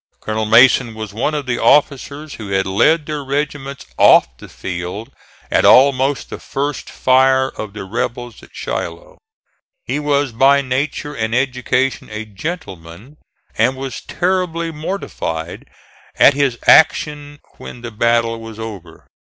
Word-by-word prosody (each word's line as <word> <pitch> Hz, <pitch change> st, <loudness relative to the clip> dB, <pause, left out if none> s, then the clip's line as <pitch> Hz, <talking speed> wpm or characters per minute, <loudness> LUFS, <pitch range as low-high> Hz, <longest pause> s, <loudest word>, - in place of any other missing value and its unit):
Colonel 110 Hz, 0 st, -3 dB
Mason 120 Hz, 0 st, +5 dB
was 110 Hz, -2 st, -7 dB
one 125 Hz, +8 st, -1 dB
of 145 Hz, -2 st, -3 dB
the 120 Hz, -1 st, -2 dB
officers 145 Hz, +3 st, +1 dB
who 105 Hz, -3 st, -8 dB
had 95 Hz, 0 st, 0 dB
led 150 Hz, +12 st, +2 dB
their 150 Hz, -2 st, -4 dB
regiments 140 Hz, 0 st, -4 dB
off -, -, +5 dB
the -, -, -12 dB
field 90 Hz, +7 st, -6 dB, 0.4 s
at -, -, +3 dB
almost 135 Hz, +1 st, +4 dB
the -, -, -6 dB
first 145 Hz, +1 st, -4 dB
fire 130 Hz, +1 st, +3 dB
of 105 Hz, -5 st, -8 dB
the 105 Hz, -, -7 dB
rebels 120 Hz, +3 st, -4 dB
at -, -, -16 dB
Shiloh. 85 Hz, 0 st, -6 dB, 0.7 s
He -, -, -2 dB
was 145 Hz, -2 st, 0 dB
by 135 Hz, +4 st, +4 dB
nature 140 Hz, +3 st, -3 dB
and 110 Hz, -1 st, -2 dB
education 130 Hz, 0 st, -1 dB
a 110 Hz, 0 st, -6 dB
gentleman, 100 Hz, -, -8 dB, 0.4 s
and 130 Hz, +1 st, +1 dB
was 135 Hz, -3 st, -6 dB
terribly 175 Hz, -2 st, -1 dB
mortified 150 Hz, -, -5 dB, 0.5 s
at 145 Hz, -, +6 dB
his 135 Hz, -3 st, 0 dB
action 150 Hz, -2 st, +3 dB, 0.2 s
when 120 Hz, -, -10 dB
the 120 Hz, -1 st, -7 dB
battle 115 Hz, +1 st, +1 dB
was 115 Hz, -1 st, -10 dB
over. 110 Hz, -5 st, -9 dB
130 Hz, 140 wpm, -18 LUFS, 110-145 Hz, 0.7 s, at